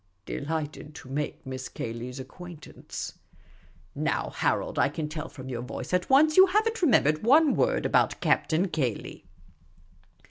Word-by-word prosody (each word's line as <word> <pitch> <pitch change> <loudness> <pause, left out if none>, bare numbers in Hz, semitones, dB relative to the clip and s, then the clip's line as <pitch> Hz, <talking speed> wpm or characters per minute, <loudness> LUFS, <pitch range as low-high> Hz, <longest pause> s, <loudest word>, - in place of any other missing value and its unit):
" 90 - -45
Delighted 150 0 -4
to 130 - -11
make 145 +2 -4
Miss 130 0 -6
Cayley's 120 +3 -6
acquaint 160 +4 -10
ance." - - -8 0.4
" - - -30
Now, - - -1
Harold, - - -1
I - - +4
can 155 -2 -4
tell 155 +1 -6
from 130 -3 -10
your 120 -3 -4
voice 125 +7 -6
at 180 0 +1
once 305 +3 +5
you 380 +1 +9
have 420 +4 +2
n't 450 -1 -2
remembered 155 - +4
one 285 +6 +5
word - - +1
about - - +2
Captain 170 +4 +2
Cayley." 135 -9 -3
155 Hz, 165 wpm, -27 LUFS, -, 0.4 s, you